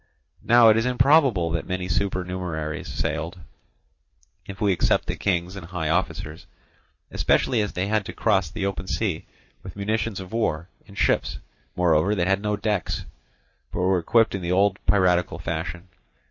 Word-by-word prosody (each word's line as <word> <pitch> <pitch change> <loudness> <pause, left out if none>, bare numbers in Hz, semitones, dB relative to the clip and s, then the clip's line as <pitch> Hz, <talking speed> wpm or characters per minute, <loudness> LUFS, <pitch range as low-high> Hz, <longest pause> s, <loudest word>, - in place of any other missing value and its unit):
Now 120 -1 +6
it 110 - +5
is 115 - +1
improbable 125 - +3
that 85 0 -2
many 90 0 -3
supernumeraries 90 -5 -2
sailed, 85 +4 -3 1.1
if 100 -1 -8
we 105 -2 +2
except 90 - +1
the - - -3
kings 90 -1 -1
and 90 -4 -8
high 85 -4 -3
officers; 85 -2 -2 0.6
especially 120 -4 +2
as 105 - -3
they 90 - -1
had 105 +1 0
to - - -4
cross 95 -5 +1
the 100 +3 -4
open 95 -1 -3
sea 95 -7 -2 0.3
with 95 - -10
munitions 105 +1 -2
of 95 +2 -9
war, 85 -7 -1 0.2
in 100 - -14
ships, - - +1 0.4
moreover, 90 +3 +2
that 90 -3 0
had 95 +2 +1
no 105 0 -1
decks, 105 -5 -2 0.7
but - - -6
were 90 0 +2
equipped 115 +6 +3
in 95 - -3
the 85 0 -2
old 100 +1 +2
piratical 90 -4 +2
fashion. 85 +1 -5
95 Hz, 160 wpm, -24 LUFS, 85-105 Hz, 1.1 s, Now